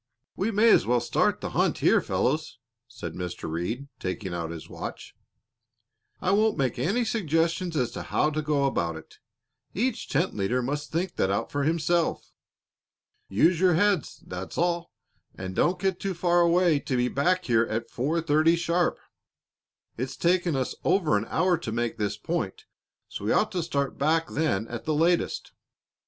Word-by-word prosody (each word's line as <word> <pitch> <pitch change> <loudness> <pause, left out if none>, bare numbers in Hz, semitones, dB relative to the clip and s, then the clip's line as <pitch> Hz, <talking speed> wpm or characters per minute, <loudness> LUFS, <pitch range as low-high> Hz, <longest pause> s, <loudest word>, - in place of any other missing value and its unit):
"We 200 - 0
may 220 +1 +5
as - - +4
well 120 0 +3
start 120 - +1
the - - -4
hunt - - +1
here, - - +4
fellows," - - -1 0.3
said - - -7
Mr. 90 -1 -5
Reed, 90 - -3
taking 95 0 -4
out 85 -1 -3
his 80 -1 -8
watch. - - -7 1.1
"I 185 - 0
won't 215 +1 +3
make 130 -3 0
any 230 +8 +1
suggestions 170 -4 0
as 125 -4 0
to - - -6
how 150 - +1
to 155 +1 -1
go 150 -2 +1
about 85 -12 0
it; 80 0 -12 0.6
each 250 +7 -1
tent 165 +7 0
leader 115 +6 0
must 145 +3 -3
think 175 +3 -2
that 95 - +2
out 100 - -1
for 145 -1 -1
himself. 165 +1 0 1.0
Use 160 - +3
your 180 -2 +4
heads, 200 +2 +1
that's 90 +1 -7
all, 170 0 0 0.4
and 95 -1 -6
don't 180 +1 +2
get 190 -1 0
too 195 -2 -3
far 175 0 +3
away 170 -2 +4
to 130 -2 -2
be 125 0 +2
back 180 +8 +1
here 115 -1 +3
at 115 +1 -3
four 155 +7 0
thirty 160 +2 +4
sharp. 170 +1 +1 1.0
It's 130 +3 -3
taken 175 -2 +2
us 130 -1 -1
over 175 -6 +2
an - - 0
hour 180 0 +2
to 125 -10 -5
make 115 +1 -2
this 105 -1 -1
point, - - -3 0.4
so 100 - -7
we 110 - +1
ought 215 - +2
to 180 -3 -1
start 140 -4 -2
back 160 +3 +2
then 145 -9 0
at 120 0 -6
the 155 - 0
latest. 170 +3 +1
155 Hz, 175 wpm, -27 LUFS, 120-175 Hz, 1.1 s, may